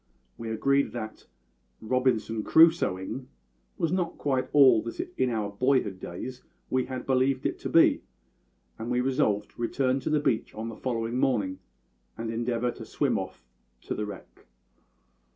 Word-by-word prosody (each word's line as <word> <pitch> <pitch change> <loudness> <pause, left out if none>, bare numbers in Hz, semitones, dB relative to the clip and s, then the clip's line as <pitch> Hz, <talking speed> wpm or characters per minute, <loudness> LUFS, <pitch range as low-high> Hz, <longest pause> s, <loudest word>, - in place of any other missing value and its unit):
We 115 -1 -6
agreed 140 +5 +1
that 110 -3 -7 0.6
`Robinson 115 -3 +1
Crusoeing' 135 - +3 0.5
was 165 - 0
not 180 -2 -1
quite 135 -3 0
all 135 -6 +7
that 115 - -7 0.2
in 130 -1 +1
our 110 -3 -2
boyhood's 105 -4 +1
days 125 +10 -7 0.3
we 130 -1 +2
had 130 -1 -5
believed 130 0 +1
it - - -1
to - - -4
be, - - +5 0.8
and 115 +1 -4
we 125 0 +1
resolved 125 -6 +1
to - - -11
return 130 +2 +1
to - - -3
the 155 -1 +3
beach 125 -6 -1
on 110 +1 -4
the 115 - -7
following 115 0 -2
morning 100 -9 +1 0.6
and 115 0 -3
endeavour 120 +1 -1
to - - -10
swim - - 0
off - - -8 0.4
to - - -4
the 105 - -3
wreck. 100 -10 -11
125 Hz, 155 wpm, -28 LUFS, 110-130 Hz, 0.8 s, all